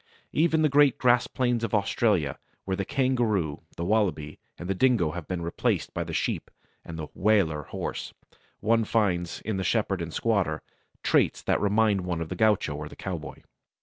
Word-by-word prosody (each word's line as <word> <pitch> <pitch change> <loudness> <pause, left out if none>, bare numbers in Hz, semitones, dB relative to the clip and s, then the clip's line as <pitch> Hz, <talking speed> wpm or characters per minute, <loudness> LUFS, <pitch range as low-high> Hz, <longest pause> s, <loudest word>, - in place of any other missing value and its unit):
Even 160 0 +3
the - - +5
great 145 -2 +4
grass 125 -1 +3
plains 120 -2 0
of 110 -2 0
Australia, 100 - +1 0.3
where 95 - -1
the 100 - -2
kangaroo, 120 - 0 0.2
the 85 - -3
wallaby, 90 -8 0 0.2
and 85 - -7
the 95 - +1
dingo 110 -7 +3
have 85 -2 -7
been 90 -2 -3
replaced 85 - -1
by - - -2
the - - -7
sheep - - -2 0.3
and 80 - -8
the 80 -1 -5
"Waler" 95 -8 +2
horse, - - -5 0.5
one 115 +1 +3
finds, 95 -6 0
in 110 -3 -3
the 95 - -1
shepherd 95 -1 0
and 85 -1 -4
squatter, 95 -7 0 0.4
traits - - +2
that - - +1
remind 105 -1 +3
one 90 -2 -3
of 80 -1 -4
the 90 - -4
gaucho 105 -6 +2
or 75 0 -6
the - - -12
cowboy. 85 -5 -6
100 Hz, 180 wpm, -27 LUFS, 85-115 Hz, 0.5 s, the